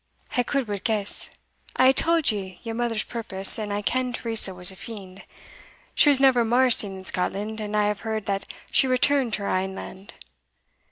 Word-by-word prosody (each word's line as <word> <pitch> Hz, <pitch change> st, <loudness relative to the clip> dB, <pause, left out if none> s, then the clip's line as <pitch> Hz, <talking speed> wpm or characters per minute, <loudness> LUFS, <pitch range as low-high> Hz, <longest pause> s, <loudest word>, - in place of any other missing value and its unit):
"I 245 Hz, -, +2 dB
could 270 Hz, +2 st, -2 dB
but 205 Hz, -3 st, -6 dB
guess. 210 Hz, -3 st, 0 dB, 0.5 s
I 255 Hz, -, +3 dB
have 260 Hz, -, +5 dB
tauld 330 Hz, -1 st, +2 dB
ye 190 Hz, -4 st, -7 dB
your 230 Hz, -1 st, -6 dB
mother's 230 Hz, -2 st, -2 dB
purpose, 215 Hz, -4 st, +6 dB
and 210 Hz, -1 st, -5 dB
I 205 Hz, +1 st, -3 dB
ken 255 Hz, +2 st, -2 dB
Teresa 225 Hz, -5 st, 0 dB
was 180 Hz, +1 st, -2 dB
a -, -, -12 dB
fiend. 195 Hz, -2 st, -11 dB, 0.7 s
She 295 Hz, -, +4 dB
was 280 Hz, -2 st, +4 dB
never 260 Hz, -3 st, +3 dB
mair 245 Hz, +3 st, +2 dB
seen 200 Hz, -4 st, +2 dB
in 190 Hz, -, -12 dB
Scotland, 210 Hz, +5 st, -3 dB
and 210 Hz, 0 st, -4 dB
I 210 Hz, -, +2 dB
have 205 Hz, -1 st, -2 dB
heard 220 Hz, -2 st, -5 dB
that 195 Hz, -1 st, -4 dB, 0.2 s
she 265 Hz, -, +3 dB
returned 255 Hz, -1 st, +1 dB
to 205 Hz, -, -3 dB
her -, -, -3 dB
ain 190 Hz, +1 st, -2 dB
land. 195 Hz, +1 st, -11 dB
220 Hz, 200 wpm, -23 LUFS, 195-245 Hz, 0.7 s, purpose